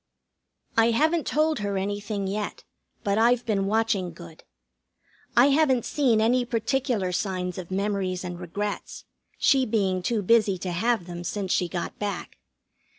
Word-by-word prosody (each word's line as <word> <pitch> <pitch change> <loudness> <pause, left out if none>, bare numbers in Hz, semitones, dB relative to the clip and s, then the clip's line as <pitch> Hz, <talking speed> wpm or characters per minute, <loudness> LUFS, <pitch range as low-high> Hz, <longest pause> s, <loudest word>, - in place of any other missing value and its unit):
I 225 0 +5
haven't 315 +7 +2
told 310 -1 +1
her 200 -1 -2
anything 205 +1 -3
yet, 205 +2 -4 0.4
but 205 -1 +1
I've 240 +1 +3
been 195 -3 0
watching 210 -5 0
good. 170 -1 -13 0.9
I 250 +4 +7
haven't 275 -4 +3
seen 255 -7 +2
any 245 +3 +3
particular 235 -4 -1
signs 180 -1 -2
of 175 - -8
memories 190 -1 -1
and 175 -1 -6
regrets, 205 +4 -5 0.3
she 270 -1 +4
being 200 -6 0
too 215 +3 -1
busy 215 -2 +3
to 180 +1 -4
have 220 +2 0
them 175 0 -7
since 190 0 -3
she 180 - +2
got 175 -1 -5
back. 205 -1 -4
205 Hz, 150 wpm, -26 LUFS, 185-235 Hz, 0.9 s, I